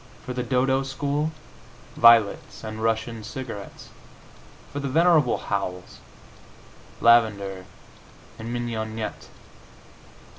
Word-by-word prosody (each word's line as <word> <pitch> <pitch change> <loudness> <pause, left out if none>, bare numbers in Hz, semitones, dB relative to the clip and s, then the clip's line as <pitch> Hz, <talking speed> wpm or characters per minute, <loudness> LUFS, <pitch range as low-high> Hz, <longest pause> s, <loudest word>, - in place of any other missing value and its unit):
For 125 - -4
the 125 - -2
"Dodo" 130 +2 +1
school, 145 +3 -2 0.6
violets 115 -3 +4
and 110 0 -6
Russian 115 0 -1
cigarettes. 115 -4 -8 0.8
For 145 - -3
the 140 - -3
venerable 160 -2 +4
Howells, 90 -3 -4 1.0
lavender 100 -5 +3 0.7
and 115 +1 -6
mignonette. 110 -2 -4
115 Hz, 85 wpm, -25 LUFS, 110-130 Hz, 1.0 s, violets